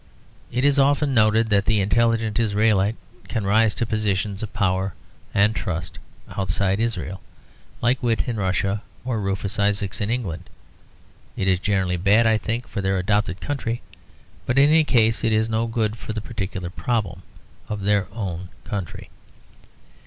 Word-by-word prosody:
It 125 +3 0
is 145 0 +4
often 140 +1 +3
noted 110 0 +3
that 100 -1 +3
the 105 0 +2
intelligent 115 +2 +1
Israelite 105 -1 +2 0.3
can 110 -5 -2
rise 110 +2 +3
to 120 - 0
positions 105 -2 -1
of 110 - -5
power 95 -1 0 0.4
and 105 +2 +3
trust 90 -4 -4 0.4
outside 95 +1 0
Israel, 95 -5 -2 0.6
like 125 +2 +2
Witte 115 -3 0
in 120 -2 -2
Russia 95 +1 0 0.2
or 120 -4 -1
Rufus 100 +1 -2
Isaacs 100 -1 0
in 100 - -1
England. 95 -8 -3 0.9
It 95 - -1
is 95 -2 +3
generally 95 -3 0
bad, 100 +6 +4
I 110 -1 +3
think, 115 +3 -3
for 100 - -4
their 95 0 +1
adopted 95 0 0
country; 120 -5 -3 0.6
but 125 - 0
in 140 +2 +6
any 160 0 +5
case 115 -5 +3
it 115 -1 +2
is 110 +1 +2
no 110 +1 +1
good 110 -2 -1
for 110 - -6
the 110 - -3
particular 95 -5 -5
problem 105 -5 -2 0.5
of 105 -2 -4
their 100 0 +2
own 95 -5 -5
country. 100 -6 -6
105 Hz, 160 wpm, -23 LUFS, 95-115 Hz, 0.9 s, in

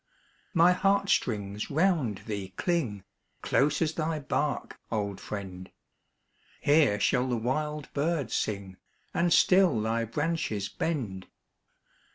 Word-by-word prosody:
My 170 +2 +6
heart 195 +2 +2
strings 105 -2 -1
round 155 - +1
thee 100 -4 -5
cling, 130 - -1 0.4
Close 145 +4 +2
as 160 0 -1
thy 160 0 -1
bark, 145 0 -2
old 100 -3 -2
friend! 95 -3 -7 0.9
Here 145 -8 +4
shall 125 +4 +2
the 120 - 0
wild 150 +5 -2
bird 145 -5 -1
sing, 100 -3 -2 0.4
And 170 0 +1
still 180 - +5
thy 115 +2 0
branches 115 - -2
bend. 110 - -3
130 Hz, 115 wpm, -28 LUFS, 105-160 Hz, 0.9 s, My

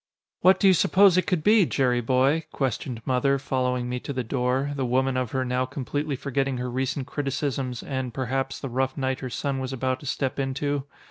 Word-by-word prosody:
"What 185 +2 +5
do - - +1
you 190 - +8
suppose 190 +1 +5
it 185 - +2
could 180 -5 0
be, 210 +1 +6
Jerry 125 -3 +1
boy?" 135 +6 +2
questioned 125 -3 -3
Mother 135 +2 +2
following 125 -2 -1
me 125 0 -2
to 140 - -6
the 130 -2 -2
door, 130 +3 0
the 135 - -1
woman 130 +1 +1
of 130 -2 -1
her 130 +1 -1
now 125 0 0
completely 145 +2 -3
forgetting 135 0 -1
her 125 0 -3
recent 130 +1 -2
criticisms 135 -3 -3
and, 130 -2 -3
perhaps, 135 +2 -2
the 135 - -4
rough 130 +1 -1
night 130 -1 -1
her 130 - -5
son 135 +2 -2
was 130 0 -3
about 130 0 -1
to 145 - -10
step 135 -1 -2
into. 140 +1 -1
130 Hz, 205 wpm, -25 LUFS, 125-140 Hz, -, you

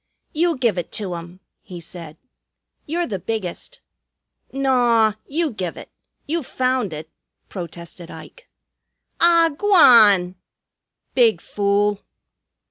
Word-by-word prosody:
"You 335 0 0
give 230 -8 0
it 175 - -7
to 195 -4 -4
'um," 170 +2 -9 0.2
he 180 -2 -10
said. 165 -2 -11 0.7
"You're 340 +3 -1
the 200 - -5
biggest." 220 - -5 0.7
"Naw! 245 -5 +2
You 315 +1 -1
give 185 -6 -5
it. - - -11 0.3
You 330 +3 -2
found 255 - -1
it," 155 0 -8 0.4
protested 170 -1 -9
Ike. - - -13 0.7
"Ah, 335 -1 +4
g'wan!" 225 - +5 0.8
"Big 230 -8 +3
fool!" 205 +1 -1
215 Hz, 110 wpm, -21 LUFS, 180-275 Hz, 0.8 s, g'wan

